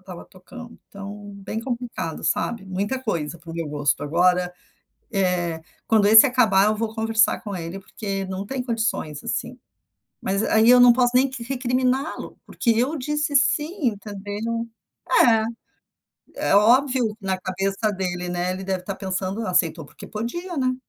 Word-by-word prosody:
estava 185 Hz, -2 st, -10 dB
tocando, 235 Hz, +6 st, -13 dB
então 205 Hz, +1 st, -9 dB
bem 200 Hz, +3 st, -5 dB
complicado 235 Hz, -11 st, -5 dB
sabe. 195 Hz, +5 st, -1 dB
Muita 200 Hz, +8 st, -2 dB
coisa 170 Hz, -, -3 dB
pro 165 Hz, -1 st, -10 dB
meu 165 Hz, -2 st, -3 dB
gosto, 145 Hz, -1 st, 0 dB
agora, 180 Hz, +3 st, +2 dB, 0.6 s
eh, 180 Hz, -5 st, 0 dB, 0.3 s
quando 215 Hz, -2 st, +4 dB
esse 220 Hz, +4 st, +9 dB
acabar 220 Hz, -7 st, +4 dB
eu 215 Hz, -, +2 dB
vou 225 Hz, 0 st, -3 dB
conversar 225 Hz, 0 st, +2 dB
com 205 Hz, -3 st, -6 dB
ele, 170 Hz, +3 st, -6 dB
porque 195 Hz, 0 st, -5 dB
não 190 Hz, +1 st, -5 dB
tem 265 Hz, +3 st, -3 dB
condições, 225 Hz, -, -2 dB
assim, 250 Hz, +1 st, -4 dB, 0.6 s
mas 195 Hz, +3 st, -1 dB
aí 220 Hz, +2 st, +4 dB
eu 250 Hz, -, +8 dB
não 245 Hz, -1 st, +8 dB
posso 245 Hz, 0 st, +2 dB
nem 265 Hz, +1 st, +4 dB
que 260 Hz, -2 st, -8 dB
recriminá-lo, 255 Hz, +2 st, -1 dB
porque 235 Hz, -, -1 dB
eu 250 Hz, +8 st, +1 dB
disse 295 Hz, +1 st, -2 dB
"sim" 300 Hz, +2 st, +2 dB
entendeu. 210 Hz, +2 st, -4 dB, 0.6 s
É. 225 Hz, -2 st, +4 dB, 0.9 s
É 200 Hz, -, +2 dB
óbvio, 245 Hz, 0 st, +3 dB
na 190 Hz, -1 st, -2 dB
cabeça 195 Hz, +3 st, -1 dB
dele, 180 Hz, -2 st, -3 dB
né, 175 Hz, +1 st, -1 dB
ele 190 Hz, +1 st, -6 dB
deve 190 Hz, -1 st, -2 dB
estar 195 Hz, +2 st, -5 dB
pensando: 190 Hz, +3 st, -3 dB
"Aceitou 165 Hz, -4 st, +1 dB
porque -, -, -13 dB
podia", 330 Hz, -, -5 dB
né. 255 Hz, -1 st, +1 dB
210 Hz, 155 wpm, -23 LUFS, 185-245 Hz, 0.9 s, esse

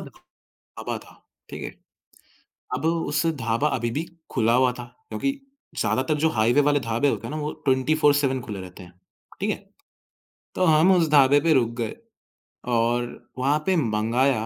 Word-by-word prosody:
ढ़ -, -, -9 dB, 0.7 s
ढाबा -, -, -4 dB
था, -, -, -17 dB, 0.3 s
ठीक -, -, -7 dB
है। -, -, -6 dB, 1.0 s
अब 140 Hz, +5 st, -4 dB
उस 165 Hz, -2 st, 0 dB, 0.2 s
ढाबा 115 Hz, +5 st, +1 dB
अभी 120 Hz, 0 st, -2 dB
भी 150 Hz, +7 st, -2 dB, 0.3 s
खुला 115 Hz, -1 st, +2 dB
हुआ 125 Hz, 0 st, +4 dB
था -, -, -5 dB, 0.3 s
क्योंकि 275 Hz, -, -1 dB, 0.5 s
ज़्यादातर 130 Hz, +4 st, +1 dB
जो 160 Hz, -, +5 dB
हाईवे 120 Hz, +4 st, +3 dB
वाले 145 Hz, 0 st, +2 dB
ढाबे 115 Hz, +4 st, +1 dB
होते 115 Hz, -2 st, -3 dB
हैं -, -, -7 dB
ना -, -, -3 dB
वो 150 Hz, +1 st, -2 dB
24-7 140 Hz, 0 st, +2 dB
खुले 105 Hz, -5 st, -6 dB
रहते 90 Hz, 0 st, -11 dB
हैं, 90 Hz, -, -15 dB, 0.5 s
ठीक -, -, -1 dB
है, -, -, -1 dB, 1.0 s
तो 185 Hz, -, +2 dB
हम 160 Hz, +3 st, +5 dB
उस 165 Hz, -3 st, +2 dB
ढाबे 140 Hz, -1 st, +6 dB
पे 165 Hz, +1 st, +3 dB
रुक 120 Hz, -4 st, +3 dB
गए 115 Hz, -, -3 dB, 0.8 s
और 120 Hz, +1 st, -1 dB
वहाँ 140 Hz, +4 st, +2 dB
पे 190 Hz, -, +2 dB
मँगाया 115 Hz, -1 st, +1 dB
130 Hz, 165 wpm, -24 LUFS, 115-150 Hz, 1.0 s, ढाबे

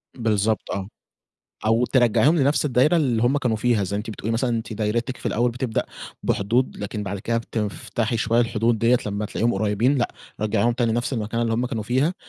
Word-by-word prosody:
بِالضبط 110 Hz, -2 st, 0 dB
آه، 95 Hz, -1 st, -3 dB, 0.8 s
أو 115 Hz, +2 st, +3 dB
تِرجَّعِيهم 130 Hz, +5 st, +3 dB
لنفس 140 Hz, +2 st, +2 dB
الدايرة 145 Hz, +4 st, +3 dB
اللي 125 Hz, -8 st, +1 dB
هُم 130 Hz, +4 st, +3 dB
كانوا 125 Hz, -5 st, 0 dB
فيها، 110 Hz, -2 st, +1 dB
زَيّ 100 Hz, +2 st, -3 dB
أنتِ 105 Hz, +2 st, -4 dB
بتقولي 110 Hz, +1 st, -4 dB
مثلًا 120 Hz, +2 st, 0 dB
أنتِ 115 Hz, -1 st, -3 dB
دايرتِك 115 Hz, +4 st, -1 dB
في -, -, -7 dB
الأول 120 Hz, +2 st, +1 dB
بتبدأ 120 Hz, -1 st, -2 dB, 0.4 s
بحدود، 120 Hz, +6 st, 0 dB
لكن 105 Hz, +1 st, -4 dB
بعد 100 Hz, 0 st, -4 dB
كده 115 Hz, +4 st, -1 dB
بتفتحي 110 Hz, +1 st, -3 dB
شوية 115 Hz, +1 st, +2 dB
الحدود 115 Hz, 0 st, +1 dB
دِيَّة 115 Hz, +3 st, +4 dB
لما 105 Hz, +1 st, -2 dB
تلاقيهم 115 Hz, +3 st, 0 dB
قُريِّبين، 110 Hz, +7 st, +1 dB
لأ 120 Hz, -, +1 dB, 0.3 s
رَجَّعيهم 110 Hz, +2 st, +2 dB
تاني 115 Hz, -1 st, 0 dB
نفس 120 Hz, +3 st, -1 dB
المكانة 115 Hz, -1 st, -1 dB
اللّي 115 Hz, -1 st, 0 dB
هُم 120 Hz, +2 st, 0 dB
كانوا 115 Hz, -4 st, -3 dB
فيها، 130 Hz, -, +1 dB
115 Hz, 190 wpm, -23 LUFS, 110-125 Hz, 0.8 s, دِيَّة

